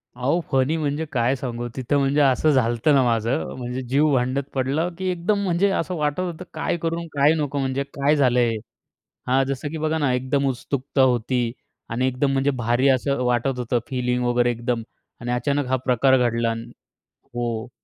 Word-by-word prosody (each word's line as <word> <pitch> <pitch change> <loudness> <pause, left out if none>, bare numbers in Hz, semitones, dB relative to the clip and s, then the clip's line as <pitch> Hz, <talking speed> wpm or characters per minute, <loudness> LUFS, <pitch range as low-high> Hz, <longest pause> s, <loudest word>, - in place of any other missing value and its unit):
अहो, 130 +8 +1
फनी 135 +3 +2
म्हणजे 150 +1 -1
काय 125 +1 +1
सांगू. 120 -2 -4
तिथं 130 +2 0
म्हणजे 140 +2 +2
असं 140 +3 +3
झालं 125 -4 +2
होतं 145 +6 +2
ना 135 - +5
माझं. 115 +4 +1
म्हणजे 125 +1 -4
जीव 145 +3 +3
भांड्यात 130 +2 +1
पडला 135 +5 0
की 190 0 -2
एकदम 180 +4 0
म्हणजे 190 +1 +2
असं 180 +2 -2
वाटत 150 +1 -1
होतं, 180 -1 -4
काय 175 - -1
करू, 165 0 -2
काय 145 +2 +4
नको? 145 -2 -2
म्हणजे 135 0 -1
काय 140 +1 0
झालं 125 -4 +3
हे. 120 -2 +2 0.7
हां, 130 +2 +3
जसं 140 +2 -3
की 160 - -4
बघा 155 +1 0
ना, 145 -5 +1
एकदम 135 +2 0
उत्सुकता 135 +2 -2
होती 125 -1 +2 0.4
आणि 125 +3 0
एकदम 130 +2 0
म्हणजे 135 +1 +2
भारी 120 +3 +2
असं 135 0 +1
वाटत 125 +1 0
होतं 120 0 0
फीलिंग 125 -1 -1
वगैरे 120 0 +2
एकदम 120 0 -2 0.4
आणि 120 +1 -3
अचानक 140 +3 0
हा 130 - +1
प्रकार 130 +1 +4
घडला 115 -2 +1
आणि 115 +1 -6 0.7
हो. 120 0 -3
130 Hz, 185 wpm, -23 LUFS, 125-145 Hz, 0.7 s, ना